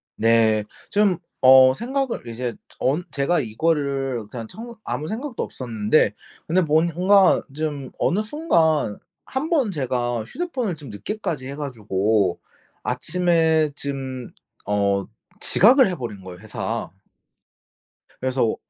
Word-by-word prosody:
네. 110 -1 +3 0.3
좀 205 -3 +3 0.2
어 130 0 +8
생각을 260 - -2
이제 120 0 -4 0.2
언 145 +7 +1
제가 145 +4 +1
이거를 135 -1 -1
그냥 115 -3 -6
청 235 - -9
아무 155 - -3
생각도 235 - -4
없었는데 110 -2 +1 0.3
근데 180 +3 +3
뭔 160 0 +3
뭔가 190 +2 +5
좀 145 -4 -3
어느 195 +5 +2
순간 165 - +1 0.3
1 265 +4 -3
번 280 -10 +3
제가 120 - -1
휴대폰을 255 - -3
좀 145 -4 -11
늦게까지 140 - -4
해 140 - -6
가지고 105 -8 0 0.4
아침에 165 -3 +2
짐 135 -3 -5 0.3
어 100 -1 +1 0.3
지각을 250 +6 +5
해버린 120 - -6
거예요 90 -1 -9
회사. - - -4 1.3
그래서 130 -3 +1
140 Hz, 230 characters per minute, -23 LUFS, 115-180 Hz, 1.3 s, 어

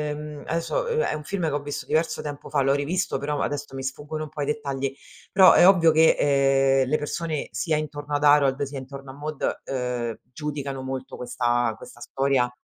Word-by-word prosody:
uhm, 150 -1 -8
adesso, 165 - -1
uhm, 470 0 0
è - - 0
un 150 - -6
film 180 +2 -2
che - - -1
ho 145 - 0
visto 145 0 -6
diverso 160 +1 0
tempo 145 -1 -7
fa, 145 -2 +2
l'ho 135 +1 +3
rivisto 150 +7 -1
però 145 0 -2
adesso 145 -1 -3
mi 135 - -5
sfuggono 145 +3 -4
un - - -11
po' 150 0 -6
i - - -1
dettagli, 140 -2 -2 0.4
però 190 -1 +8
è 175 - +7
ovvio 170 -4 +6
che, 160 +1 +5
ehm, 135 -1 +3
le 155 - +2
persone 155 0 -3
sia 150 +10 0
intorno 145 -1 -5
ad 145 0 0
Harold 145 -2 +4
sia 140 0 -3
intorno 135 +1 -9
a - - -8
Maude, 150 0 -3
uhm, 125 -3 -3
giudicano 140 -2 -5
molto 130 0 -5
questa 120 -1 0
questa 115 +2 -13
storia. 130 -1 0
145 Hz, 205 wpm, -25 LUFS, 135-150 Hz, 0.4 s, però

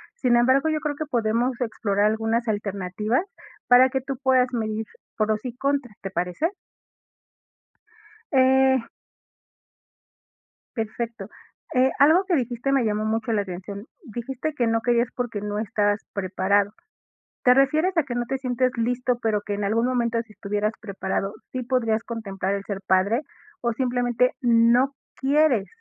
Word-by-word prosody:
sin 245 - +2
embargo, 260 +5 +3
yo 310 -1 0
creo 300 -2 -2
que 310 - -4
podemos 235 0 0
explorar 205 -3 0
algunas 225 +2 0
alternativas, 205 - -1 0.4
para 250 +1 +7
que 265 0 -1
tú 270 +1 -4
puedas 260 -1 +4
medir 220 -1 -2 0.3
pros 215 0 0
y 245 - -4
contras, 275 -5 -1
¿te 195 - -5
parece? 180 - -1 1.8
Eh. 265 0 +5 2.0
Perfecto. 225 -2 -4 0.4
Eh, 260 +1 +4
algo 320 +7 +6
que 350 - +2
dijiste 245 +1 -1
me 270 -3 +3
llamó 215 0 0
mucho 225 +1 -1
la 210 - +2
atención, 200 +3 -7 0.2
dijiste 260 +4 -5
que 245 -5 0
no 225 0 +1
querías, 240 0 +2
porque, 235 -4 -3
no 210 0 -3
estas 205 -1 0
preparado, 200 +1 +1 0.7
¿te 250 - +7
refieres 310 +7 +2
a 330 - +4
que 265 -3 -5
no 240 - -1
te 270 - -1
sientes 255 -1 0
listo 245 +1 0
pero, 215 -2 +1
que 205 0 -4
en 205 - -3
algún 225 +4 +1
momento 235 -2 0
si 215 -2 -18
estuvieras 210 +1 -2
preparado, 200 -1 -3 0.2
sí 255 -1 -3
podrías 230 -3 0
contemplar 200 -5 -3
el 195 - -4
ser 195 -2 -4
padre, 200 +7 +2 0.4
o 235 -1 0
simplemente 245 0 +1
no 240 +3 +4 0.3
quieres 275 -6 +3
235 Hz, 150 wpm, -24 LUFS, 210-260 Hz, 2.0 s, para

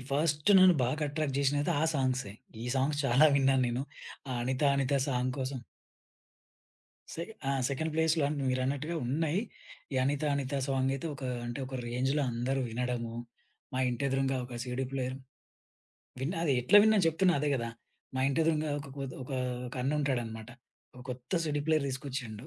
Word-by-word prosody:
First 150 +3 +1
నన్ను 185 -1 +7
బాగా 150 +5 -1
attract 145 -2 -2
జేషినదయితే 145 +1 +2
ఆ - - +4
సాంగ్సే. 130 -6 0 0.3
ఈ - - -4
సాంగ్స్ 145 +2 +1
చాలా 135 +4 +6
విన్నాను 135 -1 +3
నేను 120 +3 -1 0.6
అనిత 130 +3 -1
అనిత 140 +1 +1
సాంగ్ 125 -1 0
కోసం 130 0 -3 1.5
సె 165 - -4 0.3
ఆహ్, 135 -1 +1
సెకండ్ 160 +4 -2
ప్లేస్‌లో 160 0 +2
అంటే 145 -2 -2
మీరన్నట్టుగా 140 +5 -1
ఉన్నాయి. 160 +7 0 0.5
ఈ - - -3
అనిత 145 +2 0
అనిత 140 0 -2
సాంగ్ 135 -1 +1
అయితే 135 +4 -4
ఒక 135 - -11 0.2
అంటే 120 +2 -4
ఒక 130 - -8
రేంజ్‌లో 130 +5 0
అందరూ 125 +3 -1
వినడము, 120 -1 -2 0.6
మా 130 - -2
ఇంటి 120 +2 -2
ఎదురంగా 135 0 +1
ఒక 125 -1 -7
సీడీ 125 +1 -2
ప్లేయర్ 130 -1 -2 1.0
విన్న 150 +8 -1
అది 145 - +3
ఎట్లా 125 +12 +5
విన్నానొ 215 -4 +4
చెప్తున్నా 175 +2 +3
అదే 150 - +1
గదా! 115 -3 -2 0.5
మా 130 - 0
ఇంటి 140 +3 +1
ఎదురుంగా 155 -1 +1
ఒక 140 - -9
కొత్ 135 -2 -4
ఒక 130 +2 -7 0.5
అన్ను 140 +3 +1
ఉంటాడనమాట. 115 -5 -2 0.5
ఒక 125 - -11
కొత్త 125 +3 -8
సీడీ 150 -1 -1
ప్లేయర్ 155 -3 +3
తీసుకొచ్చిండు 130 -3 -5
135 Hz, 160 wpm, -31 LUFS, 125-150 Hz, 1.5 s, నన్ను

